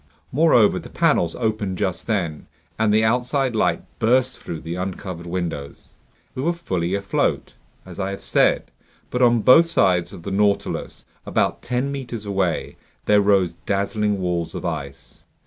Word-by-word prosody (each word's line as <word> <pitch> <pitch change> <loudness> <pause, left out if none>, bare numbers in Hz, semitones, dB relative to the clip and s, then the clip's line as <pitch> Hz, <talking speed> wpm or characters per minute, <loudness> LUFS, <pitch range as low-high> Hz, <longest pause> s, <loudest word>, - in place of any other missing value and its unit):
Moreover, 130 -7 +4
the - - -11
panels 85 -1 +1
opened 110 -5 -2
just 95 -2 -2
then, 90 -9 -2 0.3
and 110 -1 +3
the 110 +1 +4
outside 125 +2 +1
light - - +1 0.2
burst 130 +3 +2
through 80 - -6
the 85 +1 -5
uncovered 90 -1 -5
windows. 85 -5 -5 0.4
We 130 - -4
were 170 +5 +1
fully 95 - -2
afloat, 100 -1 -1 0.3
as - - -10
I 95 0 -1
have 100 - -6
said; - - +2 0.4
but 125 - -1
on 120 -2 +4
both 160 +9 +7
sides 90 - +2
of 90 -4 -11
the 100 - -5
Nautilus, 100 +1 -1 0.2
about - - 0
ten 125 +3 -2
meters 120 -6 -6
away, 95 -4 -1 0.3
there 105 -1 +5
rose 100 -4 +3
dazzling 100 +1 0
walls 90 -2 -2
of - - -5
ice. 70 -5 -6
100 Hz, 155 wpm, -22 LUFS, 90-120 Hz, 0.4 s, both